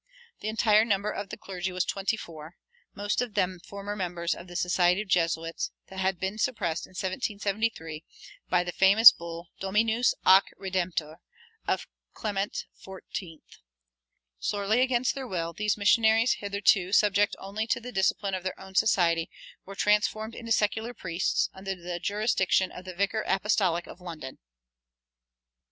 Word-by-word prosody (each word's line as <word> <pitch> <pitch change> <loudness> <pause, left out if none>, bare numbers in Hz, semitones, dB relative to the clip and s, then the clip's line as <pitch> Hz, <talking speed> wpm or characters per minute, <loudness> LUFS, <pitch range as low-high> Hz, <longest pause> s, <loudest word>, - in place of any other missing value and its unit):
The - - -5
entire 215 -1 +4
number 210 -2 0
of 200 -1 -5
the 215 - -7
clergy 190 -3 -5
was 185 0 -1
twenty 200 +3 -1
four, 160 -3 -10 0.4
most 205 +3 -1
of 245 -4 -4
them 185 -1 0
former 200 +2 -7
members 175 -3 -2
of 175 - -10
the 175 - -11
Society 180 +1 +2
of - - -19
Jesuits, 165 -2 0 0.2
that 190 - -8
had 190 -1 0
been 190 +3 -3
suppressed 170 -10 -1
in - - -20
1773 200 -5 -2 0.5
by 180 -1 +3
the 175 - -4
famous 200 +6 +8
bull, 170 0 -8
Dominus 220 +5 +2
ac 190 +1 +7
Redemptor, 175 -5 -2 0.5
of - - 0 0.3
Clement 205 -2 -3 0.2
XIV. 185 -3 -8 1.0
Sorely 205 - +1
against 255 -1 +2
their 270 -2 -6
will, 170 -5 -3
these 210 +2 0
missionaries, 220 +3 +4
hitherto 200 -2 +2
subject 205 -1 +3
only 205 +3 -4
to 235 - +1
the 245 +1 -8
discipline 195 -1 0
of 185 - -2
their 185 0 -5
own 190 0 -11
society, 170 -5 +2 0.4
were 195 - -8
transformed 215 +2 +1
into 230 -1 -8
secular 220 +3 +1
priests, 170 0 0
under 190 0 -5
the 175 -1 -6
jurisdiction 195 -1 +1
of 180 - -10
the 185 -1 -8
Vicar 205 +4 0
Apostolic 190 -3 +1
of 180 - -12
London. 165 -7 -8
195 Hz, 150 wpm, -28 LUFS, 180-215 Hz, 1.0 s, famous